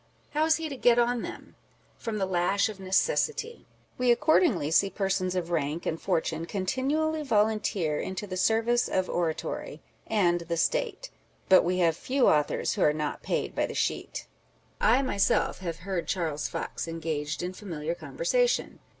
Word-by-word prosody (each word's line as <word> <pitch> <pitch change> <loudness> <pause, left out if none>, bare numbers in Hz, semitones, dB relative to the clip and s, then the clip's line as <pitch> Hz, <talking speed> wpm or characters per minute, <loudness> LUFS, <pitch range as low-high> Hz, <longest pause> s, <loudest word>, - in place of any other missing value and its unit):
How 305 +1 +2
is 320 0 +4
he 325 -1 -3
to 285 - -5
get 240 -2 +4
on, 240 0 +2
then? - - -8 0.5
From 225 -2 -3
the 195 - 0
lash 190 +3 +1
of 210 -3 -8
necessity. 455 - 0 0.3
We 250 -1 +4
accordingly 240 - +3
see 195 +4 +4
persons 190 -2 -1
of 175 -1 -2
rank 155 0 -1
and 160 - -2
fortune 165 -3 -1
continually 275 - -1
volunteer 210 - +1
into 190 +2 -4
the 185 -2 -6
service 225 +5 +2
of 185 -1 0
oratory 165 -2 -3
â€" - - -33 0.3
and 175 -5 +2
the 170 0 -3
State; - - -1 0.4
but 190 - +8
we 180 +1 0
have 165 -1 +2
few 260 - +1
authors 150 -1 +2
who - - -3
are 150 - +4
not 150 -1 -3
paid - - -2
by - - 0
the - - -7
sheet! - - -2 0.5
I 245 +5 +4
myself 200 -7 +1
have 170 -3 -4
heard 185 -4 -2
Charles 160 -6 -1
Fox - - -4
engaged 160 -2 -3
in 180 +1 -3
familiar 165 -5 -4
conversation. - - 0
195 Hz, 165 wpm, -28 LUFS, 170-250 Hz, 0.5 s, but